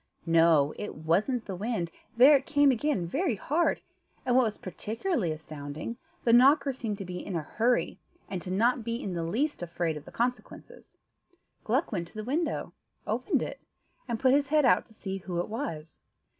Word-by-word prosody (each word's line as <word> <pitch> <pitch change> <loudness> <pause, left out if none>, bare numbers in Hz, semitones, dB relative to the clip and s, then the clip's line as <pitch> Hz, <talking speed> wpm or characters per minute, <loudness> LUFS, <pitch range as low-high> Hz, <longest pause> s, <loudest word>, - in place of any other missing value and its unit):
No; 165 -3 +4
it 210 - -5
wasn't 195 - 0
the 195 - -5
wind: 190 -4 -2 0.3
there 270 +5 +8
it 275 -1 0
came 290 -2 +5
again 250 - 0
very 275 - 0
hard, 310 - 0 0.4
and 245 - +2
what 255 -1 +5
was 215 -2 -3
particularly 220 - -2
astounding, 155 +5 -6 0.3
the 230 - +3
knocker 275 +3 +6
seemed 225 -5 -4
to 195 - -6
be 180 0 -6
in 195 - -5
a 165 - -1
hurry, 235 +10 0 0.3
and 185 -1 -5
not 235 +4 +3
to - - -7
be 230 +1 -3
in 200 -5 -4
the 170 - -2
least 235 - -1
afraid 170 -2 -2
of 150 0 -8
the - - -11
consequences. 245 +1 -4 0.7
Gluck 260 +9 0
went 175 -5 -2
to - - -17
the 215 - -4
window, 305 +8 -2 0.3
opened - - 0
it, - - -6 0.5
and 235 -2 -2
put 260 +1 +4
his 280 0 +2
head 300 -1 +4
out 245 - +4
to 225 - -19
see 195 -2 -4
who 180 -2 -4
it 175 - -2
was. 170 - -5
220 Hz, 190 wpm, -29 LUFS, 170-260 Hz, 0.7 s, there